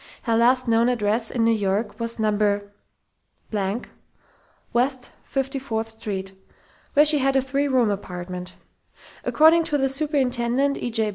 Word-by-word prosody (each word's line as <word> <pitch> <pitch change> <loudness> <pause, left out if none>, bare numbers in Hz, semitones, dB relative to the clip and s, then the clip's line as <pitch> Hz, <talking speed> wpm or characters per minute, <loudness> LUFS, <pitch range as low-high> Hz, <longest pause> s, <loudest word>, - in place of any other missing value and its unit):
Her 230 -2 +1
last 250 +2 +3
known 230 +1 +3
address 225 -1 0
in 235 - 0
New 230 - +4
York 205 +2 -1
was 230 0 -2
No. 215 -1 +1 2.4
West 255 +1 0 0.2
54th 255 -5 -3
St., 190 -2 -4 0.6
where 295 +1 +6
she 300 -1 +5
had 270 0 +1
a - - +5
three 280 +2 0
room 250 -5 +2
apartment. 180 -2 -6 0.7
According 320 +2 +5
to 295 - +1
the 270 -1 +1
superintendent, 270 -2 0
E. - - -3
J. 220 -2 0
240 Hz, 135 wpm, -23 LUFS, 220-270 Hz, 2.4 s, where